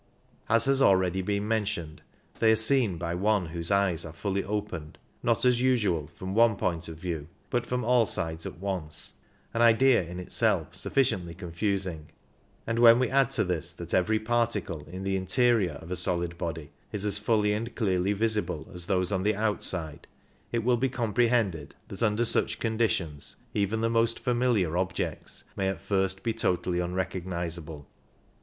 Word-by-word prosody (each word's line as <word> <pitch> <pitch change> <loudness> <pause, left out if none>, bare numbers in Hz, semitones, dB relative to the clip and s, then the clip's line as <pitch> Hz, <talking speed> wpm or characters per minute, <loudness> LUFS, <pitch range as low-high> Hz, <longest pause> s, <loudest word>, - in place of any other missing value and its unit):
As 115 0 +6
has 135 0 +3
already 95 -3 +3
been 100 +2 -2
mentioned, 105 -8 -2 0.4
they 110 -1 +5
are - - +5
seen 110 -4 +3
by 85 0 -3
one 100 +1 +1
whose 85 0 -3
eyes 100 -4 +2
are 80 - -7
fully 100 +4 -2
opened, 100 -7 -5 0.2
not 115 +2 +1
as 125 -1 +3
usual 105 - +1
from 95 +5 -7
one 115 0 +4
point 85 -3 -2
of 80 -1 -8
view, 80 -3 -4 0.2
but 120 -2 -1
from 125 0 -1
all 120 -1 +3
sides 80 -2 -3
at - - -9
once 90 -5 -2 0.2
— - - -35
an 115 - 0
idea 120 +2 +5
in 90 +1 -7
itself 90 - 0
sufficiently 90 -11 0
confusing; 90 -2 -3 0.6
and 115 +1 -1
when 115 -1 +8
we 125 -1 0
add 135 -2 +3
to 130 -5 +2
this 90 -5 -2
that - - -7
every 110 +4 +2
particle 110 -9 -1
in 95 +2 -7
the 95 0 -1
interior 105 - +2
of 80 +4 -10
a - - 0
solid 85 -1 +1
body 80 -3 -5 0.2
is 105 0 -1
as 105 0 +3
fully 105 -1 +2
and 115 +3 -4
clearly 95 -4 +1
visible 105 -7 0
as 90 -1 -6
those 90 -2 0
on 95 -2 0
the 105 +2 +1
outside, 95 -7 -2 0.4
it 115 -1 -1
will 120 +1 +3
be 130 +3 0
com 120 -4 -3
prehended 110 - +1 0.2
that 95 - -6
under 115 +1 +2
such - - +2
conditions 110 -10 -1 0.2
even 105 +2 0
the 115 - +2
most 115 0 +2
familiar 120 -9 +1
objects 90 -1 -3
may 95 - -1
at 95 - -4
first 95 -1 -1
be 115 -1 0
totally 90 -5 0
unrecognizable. 85 -4 -4
100 Hz, 175 wpm, -28 LUFS, 85-115 Hz, 0.6 s, when